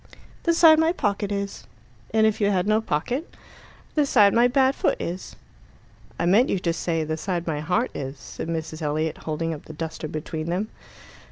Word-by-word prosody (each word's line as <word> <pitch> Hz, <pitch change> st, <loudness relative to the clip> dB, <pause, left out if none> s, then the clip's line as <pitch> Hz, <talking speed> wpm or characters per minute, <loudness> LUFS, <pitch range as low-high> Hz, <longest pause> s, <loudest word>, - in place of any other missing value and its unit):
"The 335 Hz, -, +4 dB
side 320 Hz, -2 st, +7 dB
my 320 Hz, +1 st, +3 dB
pocket 205 Hz, -, -1 dB
is." 200 Hz, 0 st, -4 dB, 0.4 s
"And 220 Hz, -1 st, +4 dB
if 220 Hz, 0 st, +1 dB
you 200 Hz, -, +3 dB
had 185 Hz, -2 st, +1 dB
no 215 Hz, +1 st, +3 dB
pocket?" 240 Hz, -, -2 dB, 0.6 s
"The 295 Hz, -2 st, +2 dB
side 205 Hz, -7 st, +5 dB
my 235 Hz, +1 st, +5 dB
bad 265 Hz, +1 st, +3 dB
foot -, -, 0 dB
is." 180 Hz, +2 st, -5 dB, 0.8 s
"I -, -, 0 dB
meant 210 Hz, +9 st, +4 dB
you -, -, +1 dB
to 170 Hz, -2 st, -1 dB
say, 165 Hz, -1 st, -1 dB
'the 155 Hz, +1 st, -3 dB
side 175 Hz, 0 st, -2 dB
my 155 Hz, -3 st, -2 dB
heart 180 Hz, +11 st, 0 dB
is,'" 135 Hz, 0 st, -5 dB
said -, -, -7 dB
Mrs. 160 Hz, -1 st, -4 dB
Elliot, 155 Hz, +1 st, -1 dB
holding 165 Hz, +1 st, -1 dB
up 150 Hz, -, -9 dB
the 155 Hz, -, -9 dB
duster 160 Hz, 0 st, -5 dB
between 155 Hz, +1 st, -5 dB
them. 185 Hz, +6 st, -1 dB
180 Hz, 190 wpm, -24 LUFS, 160-220 Hz, 0.8 s, side